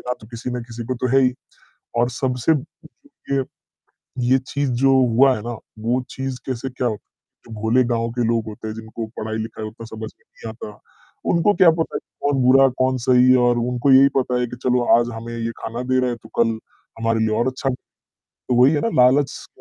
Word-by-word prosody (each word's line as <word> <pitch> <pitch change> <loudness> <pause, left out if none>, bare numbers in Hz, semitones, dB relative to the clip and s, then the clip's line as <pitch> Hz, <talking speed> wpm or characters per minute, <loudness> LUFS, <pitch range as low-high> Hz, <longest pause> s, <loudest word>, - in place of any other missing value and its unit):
देना 125 -3 -5
किसी 120 +1 -6
ना 125 0 -3
किसी 115 0 -8
को 130 - -2
तो 125 +1 -2
है - - +6
ही। 125 -1 +3 0.6
और 120 +1 +3
सबसे 125 +3 0 0.8
ये 135 -1 +1 0.9
ये 130 - +6
चीज़ 140 -2 -1
जो 135 0 +5 0.2
हुआ 130 +1 +5
है - - -6
ना, 120 -1 -5 0.2
वो 120 +4 0
चीज़ 135 -1 -5
कैसे 130 0 -4
क्या 125 -1 -2 0.6
जो 115 - -14
भोले 115 +4 +3
गाँव 115 0 -1
के 120 +1 -1
लोग 115 -1 0
होते 110 +1 -8
हैं 110 - -5
जिनको 110 0 -7
पढ़ाई-लिखाई 110 0 -4
उतना 115 +1 -10
समझ 110 -1 -7
में - - -34
नहीं 115 - -10
आता, 105 -2 -9 0.5
उनको 175 +5 +3
क्या 175 -1 +6
पता 160 0 -2
कि - - -11 0.2
कौन 140 -2 +2
बुरा, 135 +2 +6
कौन 130 +1 0
सही 130 0 +6
और 120 0 +2
उनको 125 +3 +1
यही 135 +1 +7
पता 125 -1 0
है 125 - 0
कि 120 - -8
चलो 125 -1 +2 0.2
आज 120 - -1
हमें 115 +1 -7
ये 115 0 -2
खाना 115 +2 -5
दे 130 0 +1
रहे 125 - +1
हैं, 120 - -5
तो 110 - -13
कल 115 -1 -2 0.4
हमारे 115 0 0
लिए 110 -1 +1
और 120 - +1
अच्छा 130 +1 -2 0.8
तो 125 - +2
वही 135 +4 +6
है 145 - +1
ना - - 0
लालच 135 +3 +4
स - - -10
125 Hz, 210 wpm, -21 LUFS, 115-130 Hz, 0.9 s, यही